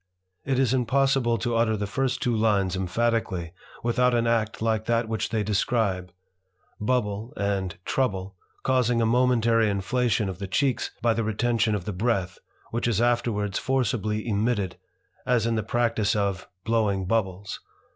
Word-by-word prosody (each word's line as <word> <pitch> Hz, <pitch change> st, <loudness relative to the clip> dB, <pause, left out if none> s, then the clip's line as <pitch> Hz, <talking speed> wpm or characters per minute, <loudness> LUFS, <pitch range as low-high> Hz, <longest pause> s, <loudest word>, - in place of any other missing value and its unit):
It 135 Hz, -1 st, 0 dB
is 130 Hz, -1 st, +2 dB
impos 135 Hz, +2 st, +2 dB
sible 120 Hz, -3 st, +1 dB
to 120 Hz, +2 st, 0 dB
utter 115 Hz, -1 st, +2 dB
the 105 Hz, -, -2 dB
first 130 Hz, +4 st, -1 dB
two 120 Hz, -2 st, +1 dB
lines 100 Hz, -4 st, +2 dB
emphatically 95 Hz, -3 st, -1 dB, 0.3 s
without 125 Hz, +1 st, +2 dB
an 120 Hz, 0 st, +2 dB
act 115 Hz, -2 st, 0 dB
like 110 Hz, -1 st, 0 dB
that 115 Hz, 0 st, +1 dB
which 110 Hz, -1 st, -2 dB
they 110 Hz, -2 st, 0 dB
describe; 100 Hz, -3 st, 0 dB, 0.7 s
bubbk 110 Hz, 0 st, -1 dB
and 95 Hz, -3 st, -1 dB
trouble 95 Hz, -7 st, -1 dB, 0.3 s
causing 125 Hz, -2 st, +2 dB
a 115 Hz, -, +2 dB
momentary 115 Hz, -2 st, +3 dB
inflation 110 Hz, +2 st, 0 dB
of 95 Hz, -2 st, -5 dB
the 100 Hz, -, -4 dB
cheeks 130 Hz, +6 st, 0 dB
by 115 Hz, -1 st, +4 dB
the 115 Hz, -, -1 dB
retention 110 Hz, 0 st, +1 dB
of 95 Hz, -4 st, -4 dB
the 105 Hz, -, -3 dB
breath, 95 Hz, -3 st, -1 dB, 0.3 s
which 120 Hz, +1 st, -1 dB
is 115 Hz, -3 st, +1 dB
afterwards 115 Hz, -4 st, +1 dB
forcibly 110 Hz, -4 st, -1 dB
emitted, 105 Hz, -2 st, 0 dB, 0.5 s
as 120 Hz, -3 st, +2 dB
in 115 Hz, -, +1 dB
the 110 Hz, -, 0 dB
practice 115 Hz, 0 st, +1 dB
of 100 Hz, -4 st, -1 dB, 0.2 s
blowing 105 Hz, -4 st, +1 dB
bubbles. 100 Hz, -1 st, -1 dB
115 Hz, 155 wpm, -26 LUFS, 100-120 Hz, 0.7 s, by